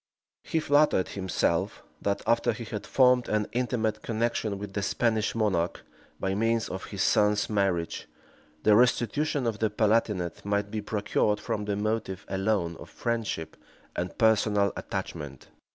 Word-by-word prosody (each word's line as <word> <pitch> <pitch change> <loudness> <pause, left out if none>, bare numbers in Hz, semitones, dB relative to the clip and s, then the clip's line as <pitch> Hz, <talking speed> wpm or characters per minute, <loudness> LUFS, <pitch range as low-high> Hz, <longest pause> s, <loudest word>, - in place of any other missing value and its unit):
He 160 - -1
flattered 145 -10 +3
himself 95 -3 -1 0.2
that, 100 0 -1
after 115 +1 +2
he 120 +1 -7
had 110 -2 -6
formed 125 -2 +4
an 105 -1 +1
intimate 115 -3 -1
connection 115 -2 -1
with 100 0 -7
the 100 - -1
Spanish 110 +2 0
monarch, 95 -6 0 0.4
by 95 0 -1
means 115 +2 +1
of 95 - -5
his 100 -2 -2
son's 105 +1 +3
marriage, 95 -5 0 0.6
the 105 - +6
restitution 125 +4 +2
of 110 -3 -1
the 110 - +2
Palatinate 105 -5 +1
might 100 0 -1
be 110 - -2
procured 105 0 0
from 105 -1 -3
the 105 -1 -1
motive 105 -2 -2
alone 95 -4 0
of - - -11
friendship 115 -9 -3 0.4
and 90 0 -3
personal 105 -3 +3
attachment. 70 -3 -6
105 Hz, 145 wpm, -28 LUFS, 100-115 Hz, 0.6 s, the